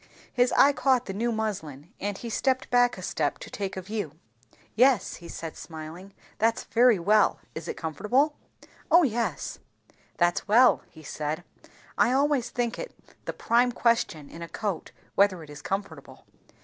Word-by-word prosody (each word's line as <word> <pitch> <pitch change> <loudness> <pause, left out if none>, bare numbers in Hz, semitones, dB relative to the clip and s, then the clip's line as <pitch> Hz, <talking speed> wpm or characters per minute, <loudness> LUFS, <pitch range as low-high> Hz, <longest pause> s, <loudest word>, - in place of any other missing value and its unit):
His 245 0 +3
eye 285 +1 +6
caught 260 -3 +2
the 195 - -5
new 235 +4 -1
muslin, 175 - -4
and 205 0 -3
he 235 - -7
stepped 260 +2 0
back 245 -1 +4
a 185 - -8
step 150 -4 -1
to - - -10
take 195 -2 -4
a 190 - -4
view. 205 -6 -4 0.6
"Yes," 250 -1 +3
he 170 - -11
said 165 -1 -7
smiling. 165 +4 -9 0.2
"That's 225 +1 +2
very 240 -2 +4
well. 205 +4 +3
Is 160 - -7
it - - -4
comfortable?" 245 - +1 0.5
"O 345 +1 +7
yes." 230 - -2 0.6
"That's 175 +2 +1
well," 240 +5 +6
he 160 - -15
said. 155 +3 -4 0.6
"I 245 - +4
always 280 -2 +2
think 240 -1 -2
it - - -7 0.3
the - - -2
prime 245 +1 +2
question 230 -11 0
in 165 - -11
a 170 - -6
coat, 200 -7 -4 0.2
whether 195 -4 +3
it 150 - -12
is 145 0 -10
comfortable." 195 +4 -5
210 Hz, 165 wpm, -27 LUFS, 170-245 Hz, 0.6 s, O